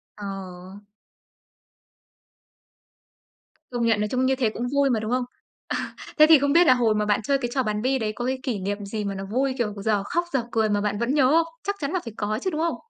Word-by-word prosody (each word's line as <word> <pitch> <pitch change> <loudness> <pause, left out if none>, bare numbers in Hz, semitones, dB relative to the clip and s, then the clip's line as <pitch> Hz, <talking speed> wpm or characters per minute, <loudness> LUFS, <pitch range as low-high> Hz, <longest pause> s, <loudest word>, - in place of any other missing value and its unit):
Ờ. 195 -1 -8 2.9
Công 240 -1 -1
nhận 225 -2 +3
nói 210 - 0
chung 255 0 +1
như 265 0 +2
thế 245 -4 +1
cũng 240 +3 -4
vui 280 -1 +3
mà, 230 -3 +1
đúng 215 +2 -4
không? 250 0 +1 0.4
À, - - -4 0.2
thế 305 - +8
thì 315 -4 +8
không 285 +1 +1
biết 340 0 +6
là 255 - +8
hồi 230 -4 +2
mà 210 0 0
bạn 210 +1 +1
chơi 275 +4 +2
cái 240 -3 -3
trò 260 -2 +1
bắn 210 -1 -2
bi 260 +1 +1
đấy 215 -1 -2
có 240 - -4
cái 260 0 -1
kỷ 235 -7 -2
niệm 200 +2 -3
gì 210 +1 -4
mà 195 -1 -3
nó 195 0 -5
vui, 260 +5 0
kiểu, 215 -4 -1
dở 205 0 0
khóc 345 +7 -1
dở 255 -3 +1
cười 220 -1 +1
mà 205 0 +1
bạn 205 0 -1
vẫn 235 +4 0
nhớ 265 -3 +4
không? 330 +1 +4 0.2
Chắc 405 +1 -2
chắn 280 0 -2
là 370 - 0
phải 230 - -7
có 215 +2 -2
chứ, 375 - -1
đúng 315 -2 -3
không? 335 0 0
235 Hz, 245 wpm, -24 LUFS, 210-270 Hz, 2.9 s, thế